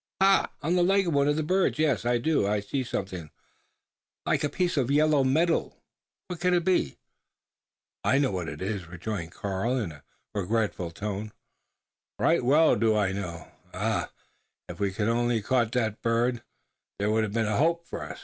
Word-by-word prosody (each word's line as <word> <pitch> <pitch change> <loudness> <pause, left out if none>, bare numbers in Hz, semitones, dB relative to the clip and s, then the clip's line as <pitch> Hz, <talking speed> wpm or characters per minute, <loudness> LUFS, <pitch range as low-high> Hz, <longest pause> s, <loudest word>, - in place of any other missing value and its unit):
"Ha! 195 0 +4
on 165 +4 +1
the 180 - +3
leg 195 +2 +3
of 170 - 0
one 140 0 +3
of 145 - +2
the 155 - -1
birds? 185 +2 +1
Yes; 145 -7 +1
I 120 0 +3
do 115 -6 +1
see 130 +6 -2
something 95 -9 -5 1.0
like - - +1
a 150 - +1
piece 180 +1 0
of 135 -4 +1
yellow 150 0 +4
metal 160 +6 +1 0.5
what 180 -2 -7
can 180 0 +2
it 170 -1 0
be?" 180 - +1 1.1
"I 135 - +3
know 140 -4 +2
what 90 -4 -3
it 75 +4 -6
is!" 95 -3 -3
rejoined 90 0 -5
Karl, 100 +6 -2
in 105 -9 -2
a 75 -2 -14 0.3
regretful 105 -3 -1
tone; 105 +4 -5 0.8
"right 165 -5 +2
well 150 +6 +5
do 110 -1 +2
I 100 -3 +1
know. 85 -5 -6 0.2
Ah! - - -1 0.6
if - - -9
we 100 -1 0
could 105 +2 -1
only 120 +1 +1
have 110 -2 -2
caught 120 -3 +2
that 110 -4 -1
bird, 120 +1 +1 0.6
there 105 +1 0
would 110 +1 +2
have 105 -2 -3
been 115 -1 +1
a 105 -1 0
hope 170 +3 +1
for - - -6
us. - - -7
115 Hz, 190 wpm, -27 LUFS, 100-150 Hz, 1.1 s, well